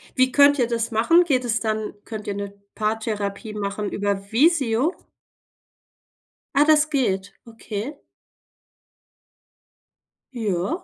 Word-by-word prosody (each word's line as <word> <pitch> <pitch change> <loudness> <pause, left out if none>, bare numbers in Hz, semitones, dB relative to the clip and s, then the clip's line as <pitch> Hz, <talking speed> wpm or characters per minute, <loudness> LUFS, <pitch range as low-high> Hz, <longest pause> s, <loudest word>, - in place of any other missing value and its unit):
Wie 255 0 +3
könnt 285 0 +5
ihr 240 - +3
das 230 0 -2
machen? 330 +11 +4
Geht 255 -6 +1
es 225 -1 0
dann 215 0 -2
könnt 215 -2 -7
ihr 205 - -1
'ne 200 0 -5 0.2
Paartherapie 215 -1 -3
machen 205 0 -3
über 200 0 -2
Visio? 275 +1 +2 1.6
Ah, 285 +1 +5
das 310 0 +4
geht, 200 -9 -1
okay. 230 +3 -6 2.4
Ja. 220 - -2
225 Hz, 110 wpm, -23 LUFS, 205-275 Hz, 2.4 s, könnt